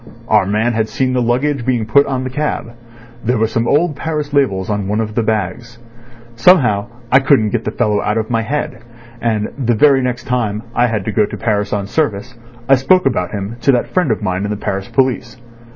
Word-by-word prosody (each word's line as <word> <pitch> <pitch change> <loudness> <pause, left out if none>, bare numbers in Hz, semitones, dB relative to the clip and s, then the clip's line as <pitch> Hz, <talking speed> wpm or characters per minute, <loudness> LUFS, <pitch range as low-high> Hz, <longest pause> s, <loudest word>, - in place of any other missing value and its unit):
Our 95 - +3
man 110 +4 +1
had 110 -1 -1
seen 130 -1 -1
the 125 - +1
luggage 125 +3 0
being 120 -3 0
put 140 +6 +4
on 130 -2 -2
the 130 - -4
cab. 150 -4 -3 0.5
There 125 +2 +1
were 110 - +2
some 115 +1 -1
old 155 +1 +2
Paris 150 -1 -4
labels 100 -10 +1
on 105 -2 -2
one 105 +2 -1
of 110 -1 -2
the 115 - +1
bags. 110 +2 -3 0.6
Somehow 115 - +4 0.2
I 130 - +7
couldn't 135 -6 +3
get 120 -2 -2
the - - -1
fellow 105 -4 0
out 105 +1 -1
of 110 +1 -2
my 115 -1 +1
head, 140 0 -3 0.4
and 110 -2 0
the 120 -3 +1
very 135 +3 +4
next 125 -1 -2
time 110 -4 -2
I 120 +1 +3
had 105 -5 -2
to 110 - -1
go 105 -1 +2
to - - -7
Paris 105 -3 -1
on 100 -1 -1
service 120 -1 -2 0.3
I 135 - +6
spoke 180 +7 +3
about 120 -9 0
him 105 +2 -5
to 140 - +4
that 120 - -1
friend 180 -6 +2
of 110 -1 -1
mine 95 0 -1
in 105 - -2
the 105 - -2
Paris 100 -1 -3
police. 130 -2 0
120 Hz, 220 wpm, -16 LUFS, 105-130 Hz, 0.6 s, I